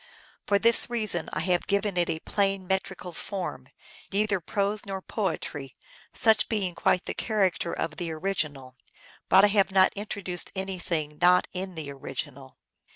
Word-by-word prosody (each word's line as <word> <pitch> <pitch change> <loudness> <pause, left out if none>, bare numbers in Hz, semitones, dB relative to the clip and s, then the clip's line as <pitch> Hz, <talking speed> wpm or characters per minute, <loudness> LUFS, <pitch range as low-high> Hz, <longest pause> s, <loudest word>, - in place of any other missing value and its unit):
For 200 - +4
this 230 +3 +4
reason 215 -8 -1
I - - -2
have 180 -2 0
given 200 -1 +1
it 175 -1 +1
a 160 - -1
plain 195 -2 0
met 190 +1 +1
rical 180 -2 -9
form, 190 +1 -5 0.4
neither 205 -1 +1
prose 200 +4 0
nor 195 -1 -4
poetry, 160 - -4 0.4
such 220 -3 +4
being 200 -5 -1
quite 180 - +1
the - - -3
character 190 -6 0
of 155 - -3
the 170 -2 -3
original. 155 -7 -3 0.5
But 195 - +7
I - - +8
have 200 -2 +3
not 190 -1 +5
intro 205 0 -5
duced 180 -1 0
anything 175 -6 -3
not 180 +1 +5
in 185 0 -4
the 150 -3 -5
original. 135 - -6
190 Hz, 160 wpm, -27 LUFS, 170-200 Hz, 0.5 s, I